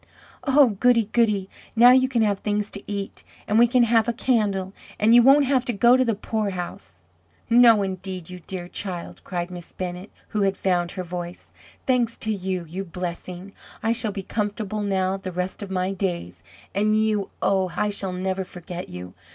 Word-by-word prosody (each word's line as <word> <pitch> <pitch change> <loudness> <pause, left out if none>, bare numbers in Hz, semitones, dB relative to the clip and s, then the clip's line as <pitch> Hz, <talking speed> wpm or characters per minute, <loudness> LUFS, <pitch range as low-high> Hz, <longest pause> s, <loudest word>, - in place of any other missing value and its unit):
"Oh, 275 -2 +5
goody! 235 -4 +3
goody! 210 -5 +2 0.3
now 240 +2 +8
you 260 0 +4
can 235 -4 +2
have 200 -2 +1
things 210 0 -2
to 200 - -2
eat! 200 -1 -5 0.2
and 215 +2 +3
we 240 - +7
can 245 0 +3
have 230 -1 +3
a 235 - +1
candle! 205 -6 0 0.3
and 220 +2 +4
you 240 - +8
won't 275 +3 +6
have 260 -2 +2
to 240 - -1
go 235 +4 +5
to 260 - +3
the 230 -4 0
poorhouse!" 195 - -4 0.6
"No, 230 -3 +7
indeed, 185 -2 -5
you 180 0 -9
dear 180 -2 -4
child!" 180 -2 -6
cried 175 -1 -4
Miss 175 -1 -10
Bennett 180 +1 -5 0.2
who 215 - -1
had 195 -1 +1
found 175 -2 0
her 185 - -4
voice. 175 0 -7 0.3
"Thanks 245 -3 +1
to 220 - -2
you 185 -3 -3
you 180 +5 -5
blessing! 180 +1 -6 0.3
I 225 - +2
shall 230 -2 +2
be 195 -1 -6
comfortable 210 0 -3
now 190 -1 0
the 190 -1 -6
rest 180 +3 -4
of 200 - -6
my 185 0 -1
days. 175 - -3 0.3
And 215 +2 +2
you! 215 -2 0
oh! 190 -2 +1
I 210 - +1
shall 195 -2 -1
never 190 +1 -2
forget 180 0 -8
you! 90 0 -8
195 Hz, 190 wpm, -24 LUFS, 185-225 Hz, 0.6 s, now